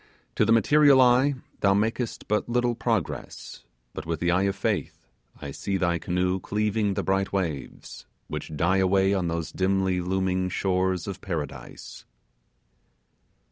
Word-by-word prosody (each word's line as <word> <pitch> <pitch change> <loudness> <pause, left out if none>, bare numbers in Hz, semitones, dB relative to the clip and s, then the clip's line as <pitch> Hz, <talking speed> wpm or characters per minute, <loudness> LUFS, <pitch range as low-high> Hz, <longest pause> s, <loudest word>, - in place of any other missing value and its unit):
To - - +2
the - - +1
material 140 +5 +5
eye 130 +3 +4 0.2
thou 100 0 +3
makest 115 +3 -2
but 105 +2 0
little 120 0 +1
progress; 115 - -4 0.3
but - - -6
with 80 -1 -3
the 85 +1 +1
eye 90 +2 +2
of 100 - -3
faith, 100 - -3 0.3
I 70 - -7
see 95 +7 -3
thy 85 -2 0
canoe 90 +2 -1
cleaving 105 +1 -1
the - - -1
bright 95 0 0
waves, 85 -8 -5 0.2
which 80 - -6
die 85 +6 +2
away 95 +1 +3
on 95 -3 0
those 85 -1 -3
dimly 95 -1 0
looming 95 0 -1
shores 95 -1 0
of 95 -2 -6
Paradise. 80 -6 -7
95 Hz, 145 wpm, -26 LUFS, 90-105 Hz, 0.3 s, material